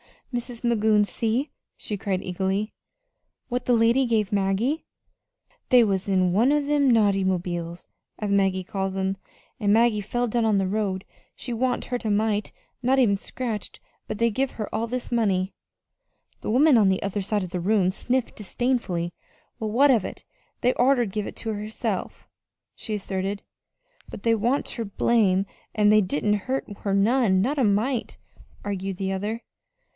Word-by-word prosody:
"Mis' 240 -1 -5
Magoon, 220 -3 +3
see," 235 +7 -1 0.3
she 210 - -4
cried 190 -1 -2
eagerly, 190 +3 -2 0.8
"what 245 0 -2
the 250 - +3
lady 235 +3 +4
give 220 -4 +1
Maggie. 205 +10 0 0.8
They 250 -2 +7
was 195 -3 0
in 185 -2 +2
one 235 +10 +3
o' 295 - +3
them 285 -1 +2
'nauty 205 -4 +3
mobiles,' 175 -2 -2 0.3
as 210 -2 -3
Maggie 195 -2 +2
calls 190 +1 -3
'em, 190 0 -1 0.4
an' 205 -2 +2
Maggie 225 -1 +4
felled 240 +3 -2
down 235 0 +1
in 215 -2 +3
the 195 -1 +1
road. 195 -2 -1 0.3
She 250 - -7
wa'n't 250 +2 0
hurt 245 -2 -4
a - - +1
mite 210 0 0 0.3
not 260 +2 +2
even 220 -7 +4
scratched, 225 -1 -5 0.3
but 215 - -4
they 230 0 +3
give 265 +5 -1
her 215 -3 -6
all 225 +2 -1
this 250 +1 -4
money." 195 -5 +1 0.9
The - - -5
woman 265 +4 +5
on 210 -3 +5
the 190 - 0
other 200 +1 -2
side 205 +1 -1
of 180 - -6
the 180 - -2
room 190 0 +2
sniffed 250 +5 -2
disdainfully. 210 -6 -1 0.5
"Well, 220 - -2
what 275 +5 +5
of 230 -6 +2
it? - - -7 0.4
They'd 250 0 +3
oughter 250 -1 +3
give 210 0 -3
it - - -8
to 225 -1 -3
her," 210 0 -5 1.1
she 215 - -5
asserted. 195 0 -3 0.7
"But - - -9
they 230 - +3
wa'n't 235 +6 +1
ter 230 - -4
blame, 200 -2 +2 0.3
an' 210 -2 +4
they 215 0 +6
didn't 190 +3 -1
hurt 265 +1 -1
her 200 - -2
none 205 -2 +3
not 275 +8 0
a 255 - +4
mite," 220 +5 0 0.5
argued 195 -1 -3
the 190 +1 -2
other. 210 +4 -3
215 Hz, 170 wpm, -25 LUFS, 195-240 Hz, 1.1 s, They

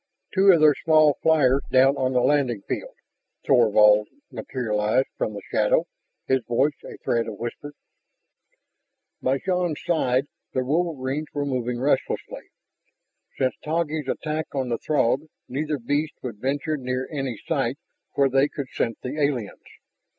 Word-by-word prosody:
"Two 195 0 +6
of 170 - +5
their 155 -1 +7
small 155 -3 +4
flyers 140 -4 +4
down 135 +2 +5
on 130 -1 0
the 125 - +3
landing 125 -7 +1
field...." - - -4 0.5
Thorvald 105 -4 +5 0.2
materialized 110 0 -1
from 105 - -2
the 100 - -7
shadow, - - +2 0.4
his 130 -2 +1
voice 135 +5 +2
a - - -9
thread 115 -1 0
of 105 - -6
whisper. 130 +5 -6 1.5
By 130 +1 +1
Shann's 180 -1 -1
side 135 -6 +1 0.3
the 130 -1 0
wolverines 150 -1 -1
were 145 0 -1
moving 125 -3 -2
restlessly. 135 +1 -1 0.9
Since 130 -1 +1
Taggi's 155 -2 -1
attack 155 +3 -2
on 130 -2 -1
the 115 - -1
Throg 145 0 +1 0.2
neither 150 +3 -2
beast 145 +5 -1
would 120 -5 -5
venture 145 +4 -1
near 125 -1 -3
any 135 -6 -3
site - - -1 0.4
where 140 - +4
they 135 +2 +3
could 140 -3 -6
scent 115 -1 -1
the 140 +4 -3
aliens. 130 -7 -1
135 Hz, 145 wpm, -24 LUFS, 125-150 Hz, 1.5 s, their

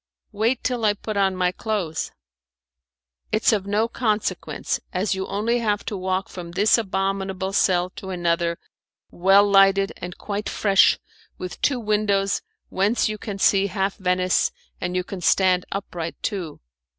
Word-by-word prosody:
"Wait 225 +4 0
till 245 -2 -1
I 210 -1 +3
put 215 +1 -5
on 195 -1 +2
my 180 -1 +1
clothes." 185 -6 -3 1.2
"It's 215 +1 +3
of 200 -2 -1
no 210 +3 +1
consequence, 220 -3 -2
as 190 +2 0
you 190 0 -3
only 220 +5 0
have 210 -3 -1
to 210 - -3
walk 185 0 -1
from 175 -2 -8
this 205 +5 +4
abominable 195 -1 -2
cell 180 -2 +2
to 190 - -7
another, 170 -1 0 0.5
well 195 +3 +5
lighted 195 0 +4
and 180 0 -7
quite 205 0 -4
fresh, 195 -2 +4 0.4
with 180 -1 -7
two 270 -3 +2
windows 210 -3 +1 0.3
whence 205 +4 +1
you 215 0 -4
can 200 -2 -5
see 195 0 +3
half 195 0 -1
Venice, 180 -1 +1 0.3
and 180 0 -2
you 180 - +1
can 185 0 -7
stand 185 +1 +3
upright 175 -4 -4
too." 185 -8 -3
195 Hz, 150 wpm, -23 LUFS, 185-210 Hz, 1.2 s, well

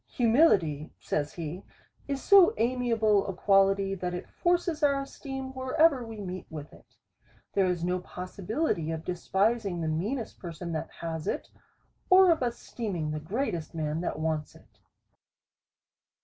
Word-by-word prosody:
Humility, 205 - +3
says 145 -1 -2
he, 170 +3 -6 0.4
is 275 -1 -3
so 390 -3 +7
amiable 225 -3 +2
a 195 - -4
quality, 195 0 +3
that 180 -2 -3
it 180 - -6
forces 345 -2 0
our 280 -2 +3
esteem 270 -1 -7
wherever 260 +1 +3
we 225 -2 -8
meet 185 -2 -6
with 150 -2 -8
it. - - -19 0.6
There 195 -2 +3
is 175 -2 -1
no 180 +1 0
possibility 185 - -3
of 160 0 -4
despising 195 +2 0
the 160 - -2
meanest 210 - -2
person 170 -1 -6
that 160 -1 -3
has 160 -2 -4
it, - - -2 0.6
or 370 -1 +7
of 325 - +1
esteeming 215 -9 -3
the 155 - -3
greatest 170 - -3
man 155 0 -2
that 175 - -3
wants 155 -1 -2
it. - - -21
195 Hz, 145 wpm, -28 LUFS, 165-255 Hz, 0.6 s, so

